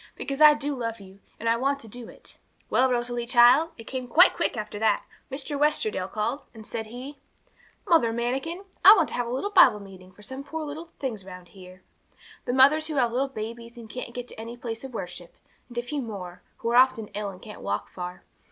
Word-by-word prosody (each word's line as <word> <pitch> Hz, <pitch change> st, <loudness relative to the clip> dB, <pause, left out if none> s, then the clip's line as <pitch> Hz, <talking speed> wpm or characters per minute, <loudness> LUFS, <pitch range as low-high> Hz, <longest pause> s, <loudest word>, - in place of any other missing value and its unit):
because 275 Hz, +2 st, -5 dB
I 300 Hz, -1 st, +9 dB
do 290 Hz, 0 st, -3 dB
love 230 Hz, -3 st, -4 dB
you, 195 Hz, 0 st, -14 dB, 0.2 s
and 230 Hz, +1 st, +1 dB
want 275 Hz, +1 st, +1 dB
to 225 Hz, -, -10 dB
do 235 Hz, +2 st, -8 dB
it_." -, -, -13 dB, 0.3 s
'Well, 260 Hz, +1 st, +4 dB
Rosalie, 240 Hz, -1 st, -1 dB
child, 250 Hz, +6 st, +6 dB
it 225 Hz, -, -9 dB
came 255 Hz, +2 st, -5 dB
quite 350 Hz, +9 st, +6 dB
quick -, -, -1 dB
after 210 Hz, -1 st, -5 dB
that. 220 Hz, -1 st, +2 dB, 0.3 s
Mr. 280 Hz, +1 st, -3 dB
Westerdale 220 Hz, -10 st, +1 dB
called, 230 Hz, +6 st, -2 dB
and, 220 Hz, -1 st, -11 dB
said 220 Hz, 0 st, -4 dB
he 260 Hz, +5 st, -9 dB, 0.7 s
'"Mother 320 Hz, -, +4 dB
Manikin, 265 Hz, +11 st, -3 dB, 0.2 s
I 405 Hz, +4 st, +11 dB
want 330 Hz, -7 st, +2 dB
to -, -, -9 dB
have 245 Hz, -1 st, -1 dB
a -, -, -4 dB
little 270 Hz, +12 st, -2 dB
Bible 355 Hz, -, +6 dB
Meeting 190 Hz, -2 st, -13 dB
for 210 Hz, +3 st, -17 dB
some 260 Hz, +6 st, -7 dB
of 280 Hz, -, -8 dB
the -, -, -19 dB
poor 320 Hz, +1 st, -5 dB
things 230 Hz, -8 st, -4 dB
round 180 Hz, -2 st, -11 dB
here 185 Hz, 0 st, -14 dB, 0.6 s
the 245 Hz, -, -1 dB
mothers 285 Hz, +4 st, +5 dB
who 310 Hz, -, -4 dB
have 245 Hz, -4 st, +2 dB
little 260 Hz, +3 st, 0 dB
babies, 235 Hz, 0 st, -7 dB
and 230 Hz, -2 st, -10 dB
can't 235 Hz, +1 st, -7 dB
get 245 Hz, 0 st, -5 dB
to -, -, -10 dB
any 230 Hz, +2 st, -8 dB
place 230 Hz, -1 st, -6 dB
of 265 Hz, -3 st, -8 dB
worship, 175 Hz, -3 st, -7 dB, 0.3 s
and 240 Hz, -, -11 dB
a 240 Hz, -, 0 dB
few 280 Hz, +4 st, -3 dB
more, 190 Hz, -7 st, -7 dB, 0.2 s
who 230 Hz, -, -3 dB
are 240 Hz, -, +3 dB
often 250 Hz, -4 st, +4 dB
ill, 205 Hz, -1 st, -4 dB
and 185 Hz, -2 st, -12 dB
can't 215 Hz, -, -10 dB
walk 100 Hz, +1 st, -2 dB
far. 180 Hz, 0 st, -7 dB
240 Hz, 225 wpm, -26 LUFS, 215-275 Hz, 0.7 s, I